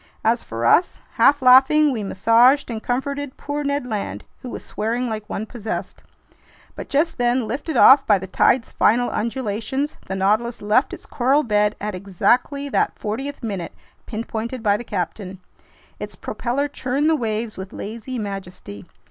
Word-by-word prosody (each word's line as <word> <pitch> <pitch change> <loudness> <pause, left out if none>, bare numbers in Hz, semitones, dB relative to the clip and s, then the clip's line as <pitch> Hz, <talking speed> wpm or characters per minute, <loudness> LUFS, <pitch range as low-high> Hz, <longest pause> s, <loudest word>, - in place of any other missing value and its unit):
As 230 +2 +2
for 115 +1 -5
us, 350 - +3 0.2
half 285 -1 +4
laughing, 270 +4 +6
we 235 -5 -3
massaged 230 +7 +3
and 220 -1 -4
comforted 275 +3 -3
poor 290 0 -4
Ned 280 -2 -1
Land, 215 -4 -4 0.2
who 250 - -7
was - - -8
swearing 235 +4 -2
like 215 -2 -5
one 215 - -3
possessed. 220 -1 -6 0.7
But - - -8
just 300 0 0
then, 245 -1 +1
lifted 290 +6 -3
off 270 - +7
by 205 - +5
the 190 - -6
tide's 230 +6 +2
final 245 +3 +2
undulations, 235 +4 -3
the 190 - -3
Nautilus 215 +5 0
left 210 +6 +2
its - - -9
coral 270 +4 +1
bed 210 -3 +1
at 210 0 -4
exactly 240 +9 0
that - - 0
fortieth 265 +7 -5
minute 195 -6 -4 0.3
pinpointed 230 +1 -5
by 205 -2 +3
the 240 - -5
captain. 185 -1 -5 0.6
Its - - -7
propeller 270 +4 -2
churned 280 +1 -1
the 320 - +4
waves 220 -3 -3
with 190 0 -8
lazy 230 +4 -6
majesty. 195 - -7
235 Hz, 160 wpm, -21 LUFS, 210-265 Hz, 0.7 s, off